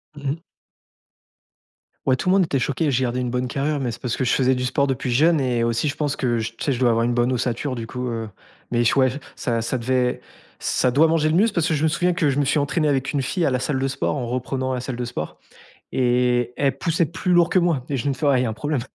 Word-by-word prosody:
Mmh 140 -2 -4
mh. 155 - -3 1.7
Ouais, 130 - +4
tout 180 - -2
le - - +5
monde 190 -3 +4
était 140 - -1
choqué, 145 +4 0
j'ai 130 -1 +1
gardé 125 0 -1
une 125 -1 -1
bonne 125 +1 -1
carrure, 140 +3 -1
mais 125 -3 -1
c'est - - -9
parce 125 -2 -2
que 130 - -1
je 125 - +1
faisais 130 0 +3
du 125 - -2
sport 140 +3 +1
depuis 130 -1 -2
jeune 155 +4 +4
et 120 -3 +1
aussi, 115 +5 0
je 145 - -4
pense 145 -2 -1
que 120 -3 0
j 115 +1 -4
tu - - -7
sais, 145 - +1
je 125 - -1
dois 125 - +4
avoir 115 0 +2
une 120 +1 +1
bonne 120 +1 +1
ossature, 125 +2 -2
du 115 -2 -5
coup, 125 +1 -5
heu. 115 -2 -4 0.4
Mais 120 0 +2
j - - +4
ouais 130 -1 +5 0.3
ça 115 -2 -1
ça 115 +3 -2
devait 125 +1 0 0.4
ça 125 - +1
doit 155 +5 +5
manger 160 -1 +2
le 160 - +1
muscle, 215 +3 +3
parce 170 -5 +1
que 160 - +1
je 150 - 0
me 160 - +4
souviens 175 +3 +1
que 165 -5 +1
je 135 - 0
me 145 - +2
suis 145 +2 +2
entraîné 145 +2 0
avec 135 -2 0
une 145 - 0
fille 165 +6 -1
à - - +2
la 125 - +1
salle 135 +2 -1
de 135 - 0
sport, 135 +2 -1
en 130 -4 -3
reprenant 130 +1 -2
la 125 - -2
salle 130 -1 -4
de 125 - -3
sport 100 -11 -5 0.5
et 125 -1 +1
elle 140 -1 +1
poussait 165 -1 +1
plus 180 +2 -2
lourd 175 -1 +5
que - - +2
moi 170 -7 +1
et 140 - -1
je 135 - -2
me 140 - +1
fais: 130 - -4
«Ouais 135 -3 +4
il - - +1
y - - 0
a - - -1
un - - -3
problème!» 140 +4 -2
130 Hz, 290 wpm, -22 LUFS, 125-150 Hz, 1.7 s, le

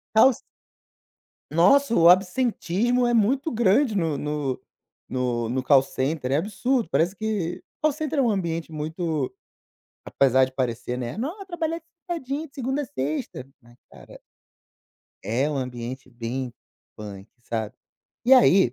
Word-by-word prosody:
Call 260 +5 +7
c - - -11 1.1
Nossa, 235 - +4
o 170 -3 +7
absentismo 225 +4 +2
é 240 - +1
muito 260 +8 +2
grande 230 +1 +3
no 165 -6 0
no 150 -3 -2 0.5
no 125 -3 -1
no 130 +3 -1
call 135 0 +5
center, 135 0 -2
é 135 - +3
absurdo, 220 - 0
parece 175 +4 +1
que 210 -6 -2 0.2
call 310 - +4
center, 305 0 -3
é - - +5
um 240 - +2
ambiente 170 -5 -2
muito 155 -2 -3 0.7
apesar 130 -1 +3
de 130 - -7
parecer, 125 -1 -2
né: 120 +3 -4
"Não, 310 - -4
é - - -9
trabalhar 330 -3 -3 0.3
sentadinho, 310 -2 -3
segunda 270 +1 -2
a - - -3
sexta", 145 - -4 0.2
mas, 120 -1 -20
cara - - -14 1.0
É 120 +8 0
um 145 - -2
ambiente 125 0 -5
bem 120 +1 -4 0.4
punk, 100 -1 -9
sabe. 110 -3 -4 0.5
E 250 - +4
aí 200 - +6
165 Hz, 145 wpm, -25 LUFS, -, 1.1 s, Call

